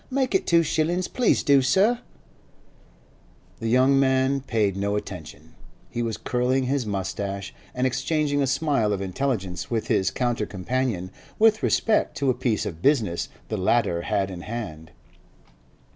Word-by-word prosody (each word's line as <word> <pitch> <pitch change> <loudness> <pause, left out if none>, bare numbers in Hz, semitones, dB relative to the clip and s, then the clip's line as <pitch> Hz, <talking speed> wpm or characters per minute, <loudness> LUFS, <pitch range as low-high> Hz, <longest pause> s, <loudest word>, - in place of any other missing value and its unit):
'Make 265 0 0
it 385 - +1
two 170 -1 +5
shillin's—please 175 +9 +1
do, 140 -3 +5
sir! 205 - +3 1.6
The 115 - -3
young 130 +4 +4
man 130 0 +2
paid 110 -7 0
no 100 +1 -1
attention; 90 -6 -7 0.4
he 120 - -2
was 115 -2 -2
curling 125 +2 0
his 130 -2 -1
moustache 100 0 -3 0.2
and 125 +1 0
exchanging 145 +3 0
a 135 - +1
smile 135 -6 +1
of 100 - -3
intelligence 95 -5 -2
with 115 -2 -2
his 95 - +2
counter 120 -4 -1
companion 100 -1 -2 0.3
with 220 0 +4
respect 220 -1 +1
to 135 -2 +2
a - - 0
piece 120 -3 -1
of 85 -3 -6
business 110 - +1 0.2
the 110 - -2
latter 95 -2 +1
had 100 0 -1
in 90 -2 -7
hand. 85 -8 -6
125 Hz, 145 wpm, -25 LUFS, 100-140 Hz, 1.6 s, two